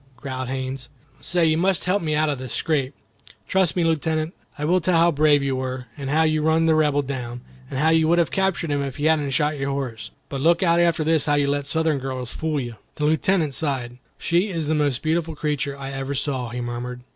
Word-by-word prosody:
growled 130 -1 -5
Haines. 130 -1 -4 0.3
"Say, 175 -2 +1
you 160 0 +2
must 185 0 +2
help 185 +3 +1
me 155 -2 -1
out 155 +1 +2
of 140 - -4
this 130 -2 -5
scrape." 140 -4 0 0.5
"Trust 190 -3 +2
me, 175 - +1
Lieutenant; 160 0 0 0.2
I 150 - -2
will 180 +3 +3
tell 170 +1 +2
how 170 +1 +5
brave 145 -1 +3
you 135 -1 0
were, 130 -1 -4
and 140 -2 -5
how 155 +3 +3
you 155 -1 +2
run 160 +1 +3
the 160 - +4
Rebel 150 -2 +2
down, 125 -3 -5 0.3
and 135 - -4
how 155 +4 +3
you 160 -1 +4
would 170 +2 +3
have 170 -2 +2
captured 190 -5 0
him 145 0 0
if 135 -2 -4
he 150 - -3
hadn't 155 -3 +2
shot 150 +2 0
your 135 0 -1
horse. 120 -6 -4 0.2
But 135 -1 -5
look 170 +4 +3
out 170 -1 +4
after 170 -2 +2
this 160 -1 +2
how 145 - +3
you 145 -1 +2
let 140 0 -1
Southern 160 -1 +1
girls 130 -2 -5
fool 155 -2 -1
you." 120 -4 -6 0.2
The 150 - -1
Lieutenant 160 0 +2
sighed. 125 -5 -2 0.2
"She 175 +5 +1
is 165 -4 -2
the 155 - 0
most 145 -4 0
beautiful 160 0 0
creature 145 -2 -2
I 135 0 -6
ever 135 +1 -4
saw," 130 -3 -2
he 120 +1 -4
murmured. 120 +1 -5
150 Hz, 235 wpm, -23 LUFS, 135-160 Hz, 0.5 s, how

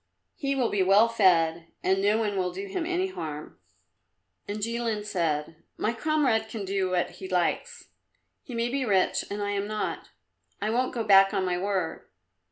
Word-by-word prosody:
He 275 -1 -1
will 255 -4 +1
be 200 - +1
well 195 +4 +5
fed, 170 -7 +3 0.2
and 190 +1 +2
no 205 +2 +3
one 210 -3 -1
will 180 -1 0
do 195 +3 -6
him 325 - -3
any 365 +1 0
harm." 155 - -7 0.9
And 205 - -3
Jilin 230 -1 -2
said, 160 -5 -1 0.2
"My 225 - 0
comrade 245 -4 +1
can 215 -3 -5
do 190 -1 0
what 180 -1 0
he 190 - -9
likes. 180 -2 -1 0.5
He 250 - -9
may 235 +1 0
be 270 +2 -1
rich, 195 -6 +2
and 205 0 -3
I 205 - -1
am 200 0 -2
not. 215 0 -3 0.5
I 210 +2 -1
won't 250 +3 0
go 230 - -1
back 195 -2 +6
on 190 - +1
my 180 -1 0
word. 190 -3 -2
205 Hz, 180 wpm, -27 LUFS, 185-230 Hz, 0.9 s, back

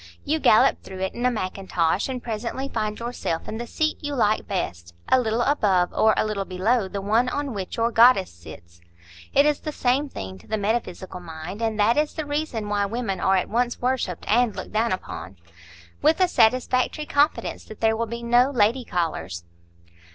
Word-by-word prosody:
You 315 +2 0
gallop 215 - +4
through 190 0 -9
it 190 - -2
in 240 +1 0
a - - +4
mackintosh, 185 -3 -1
and 255 -2 -4
presently 235 +4 -4
find 215 -4 -3
yourself 235 -8 -3
in 220 - -5
the 240 - -5
seat 310 +5 -1
you 290 -1 -3
like 215 -4 +1
best,—a 85 - -1
little 230 0 0
above 195 -11 +2
or 220 0 +4
a - - +2
little 210 -2 -2
below 195 +4 0
the 200 +1 -5
one 225 +5 +2
on 285 -1 -3
which 195 -3 -5
your 230 +1 +1
goddess 230 -4 +5
sits 85 0 -14 0.5
(it 280 - +4
is 300 -1 +2
the 305 - -5
same 275 +1 0
thing 95 - -7
to - - -19
the 220 - -1
metaphysical 200 -4 -3
mind, 175 +4 -8
and 220 -2 -1
that 225 +5 +3
is 300 0 0
the 310 - -3
reason 290 -7 -3
why 205 -1 0
women 215 -4 -3
are 190 - +3
at 185 - +1
once 240 +2 -1
worshipped 245 -8 -2
and 235 0 +2
looked - - -7
down 225 +2 +1
upon), 95 - -5 0.6
with 315 +3 +3
a 370 - +5
satisfactory 255 +2 +2
confidence 290 +1 +1
that 215 - -11
there 220 0 +2
will 230 +1 -2
be 235 +1 -6
no 240 +2 +4
lady 240 0 +2
callers. 160 - -3
220 Hz, 195 wpm, -24 LUFS, 190-250 Hz, 0.6 s, goddess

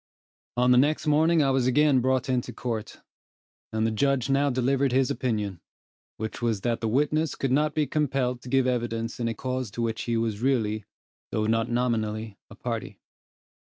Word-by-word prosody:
On 125 +1 +4
the 125 - +6
next 150 +3 +2
morning 155 +2 +4
I 135 - +2
was 130 -2 +2
again 140 +1 +4
brought 130 0 +1
into 125 -2 -1
court, 115 -4 -5 0.7
and 110 0 0
the 110 - +1
judge 135 +2 +1
now 140 +1 +3
delivered 130 +1 +1
his 130 0 +2
opinion, 105 -7 -2 0.6
which 110 +2 -5
was 115 -4 0
that 120 +1 -1
the 115 - 0
witness 150 +6 +1
could 135 - -2
not 150 +2 +2
be 155 - +2
compelled 135 -5 -1
to 125 - -9
give 135 0 +3
evidence 115 -2 -2
in 120 - 0
a 115 - -2
cause 130 0 -3
to 120 - -5
which 115 -1 -2
he 115 -1 0
was 110 -2 -1
really, 110 -5 0 0.4
though 110 0 -1
not 115 +1 +1
nominally, 110 -3 -1
a - - -12
party. - - -5
125 Hz, 185 wpm, -26 LUFS, 115-135 Hz, 0.7 s, the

